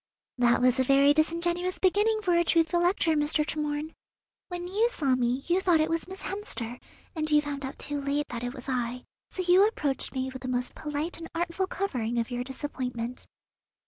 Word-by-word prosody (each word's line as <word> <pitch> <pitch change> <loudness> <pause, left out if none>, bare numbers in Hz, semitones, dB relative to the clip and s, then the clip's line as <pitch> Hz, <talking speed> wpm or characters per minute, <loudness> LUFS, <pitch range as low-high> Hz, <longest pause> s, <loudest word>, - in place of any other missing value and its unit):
"That 240 0 +4
was 255 +1 +3
a - - +4
very 275 +2 +5
disingenuous 345 +3 0
beginning 425 +3 +2
for 360 -3 +2
a 345 - +4
truthful 335 +1 +2
lecture, 345 -2 +2
Mr. 300 0 +1
Tremorne. 300 +1 -3 0.5
When 355 -1 -5
you 430 +6 +2
saw 285 - +1
me, 250 +2 0
you 355 +2 +2
thought 355 -4 +4
it 310 +1 +1
was 330 +1 -1
Miss 380 +1 -9
Hemster, 250 - -4 0.4
and 310 -1 -1
you 300 -1 +5
found 290 -1 -4
out 265 - -5
too 290 -1 -3
late 285 +1 0
that 235 -1 -5
it 245 +2 -4
was 255 0 -9
I; 250 -1 -2 0.3
so 370 - -3
you 360 +2 +6
approached 285 -11 -1
me 260 0 -2
with 260 - -8
the 255 - -5
most 250 0 -1
polite 300 +3 -3
and 330 - -6
artful 345 +2 -1
covering 245 - -2
of 235 +2 -1
your 245 0 -2
disappointment." 250 -3 -5
295 Hz, 200 wpm, -28 LUFS, 255-345 Hz, 0.5 s, you